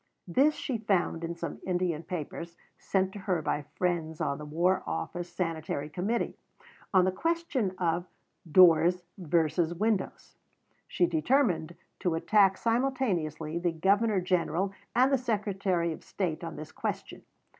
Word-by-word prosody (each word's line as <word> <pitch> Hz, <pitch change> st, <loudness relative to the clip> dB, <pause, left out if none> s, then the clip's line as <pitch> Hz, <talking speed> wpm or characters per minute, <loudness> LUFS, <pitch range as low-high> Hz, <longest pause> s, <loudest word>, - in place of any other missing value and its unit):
This 275 Hz, -, +3 dB
she 250 Hz, -5 st, -3 dB
found 185 Hz, -6 st, 0 dB
in 170 Hz, +1 st, -3 dB
some 170 Hz, 0 st, -5 dB
Indian 175 Hz, -3 st, -1 dB
papers, 170 Hz, 0 st, -6 dB, 0.2 s
sent 190 Hz, -1 st, 0 dB
to 205 Hz, -, -7 dB
her 190 Hz, -3 st, 0 dB
by 150 Hz, 0 st, 0 dB
friends 165 Hz, -3 st, -1 dB
on 140 Hz, -3 st, -1 dB
the 150 Hz, -, -7 dB
War 175 Hz, +5 st, +1 dB
Office 175 Hz, -, -4 dB
Sanitary 160 Hz, -4 st, -3 dB
Committee, 195 Hz, +9 st, -1 dB, 0.6 s
on 185 Hz, -2 st, +5 dB
the 185 Hz, -, +2 dB
question 275 Hz, -, -1 dB
of 175 Hz, 0 st, 0 dB, 0.4 s
"Doors 175 Hz, 0 st, +6 dB, 0.2 s
versus 170 Hz, 0 st, +1 dB
Windows." 210 Hz, +1 st, -2 dB, 0.5 s
She 355 Hz, -, +2 dB
determined 255 Hz, -, +1 dB, 0.2 s
to 175 Hz, -3 st, 0 dB
attack 195 Hz, +3 st, +4 dB
simultaneously 205 Hz, -, 0 dB
the 175 Hz, 0 st, +1 dB
Governor 200 Hz, +5 st, +2 dB
General 180 Hz, +1 st, 0 dB, 0.2 s
and 260 Hz, +3 st, +4 dB
the 270 Hz, -, +4 dB
Secretary 195 Hz, -7 st, 0 dB
of -, -, -11 dB
State 175 Hz, -5 st, -3 dB
on 165 Hz, -1 st, -5 dB
this 155 Hz, -, -8 dB
question. -, -, -4 dB
180 Hz, 140 wpm, -29 LUFS, 165-205 Hz, 0.6 s, Doors